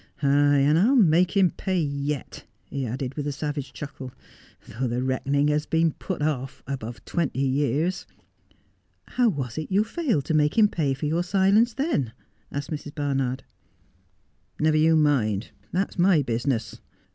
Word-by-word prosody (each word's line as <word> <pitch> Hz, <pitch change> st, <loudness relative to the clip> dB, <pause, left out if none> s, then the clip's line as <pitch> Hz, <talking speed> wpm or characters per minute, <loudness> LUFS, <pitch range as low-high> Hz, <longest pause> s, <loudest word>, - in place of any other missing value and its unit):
Ay, 145 Hz, +1 st, +4 dB
and 150 Hz, +3 st, +4 dB
I'll 240 Hz, +9 st, +4 dB
make 180 Hz, -3 st, +4 dB
him 185 Hz, -3 st, +4 dB
pay 190 Hz, -2 st, -2 dB
yet,' 140 Hz, -2 st, -3 dB, 0.3 s
he 135 Hz, -2 st, -2 dB
added 125 Hz, +3 st, -4 dB
with 145 Hz, 0 st, -4 dB
a -, -, -1 dB
savage 145 Hz, -1 st, -4 dB
chuckle, 135 Hz, -3 st, -8 dB, 0.3 s
' -, -, -27 dB
though 125 Hz, +4 st, -3 dB
the 120 Hz, +2 st, -2 dB
reckoning 140 Hz, +3 st, +1 dB
has 150 Hz, +1 st, 0 dB
been 165 Hz, 0 st, +2 dB
put 170 Hz, 0 st, -5 dB
off 135 Hz, -4 st, -3 dB
above 120 Hz, -3 st, -6 dB
twenty 140 Hz, -5 st, -1 dB
years.' 145 Hz, +6 st, 0 dB, 0.5 s
' -, -, -42 dB
How 245 Hz, -2 st, +5 dB
was 135 Hz, -, -4 dB
it 155 Hz, -, -6 dB
you 200 Hz, +3 st, +3 dB
failed 225 Hz, -, -1 dB
to -, -, -1 dB
make 150 Hz, +2 st, +2 dB
him 210 Hz, -2 st, +6 dB
pay 145 Hz, -8 st, 0 dB
for 135 Hz, -, -5 dB
your 160 Hz, +3 st, +1 dB
silence, 200 Hz, +5 st, +3 dB
then? 260 Hz, -, -1 dB, 0.2 s
' 105 Hz, +1 st, -40 dB
asked 145 Hz, +2 st, -5 dB
Mrs. 145 Hz, -1 st, -6 dB
Barnard. 135 Hz, -3 st, -1 dB, 0.6 s
' -, -, -42 dB
Never 155 Hz, 0 st, +3 dB
you 160 Hz, +1 st, +4 dB
mind. 120 Hz, -10 st, +1 dB, 0.2 s
That's 190 Hz, 0 st, -2 dB
my 175 Hz, -4 st, +4 dB
business. 115 Hz, -2 st, -2 dB
145 Hz, 170 wpm, -25 LUFS, 135-170 Hz, 0.6 s, him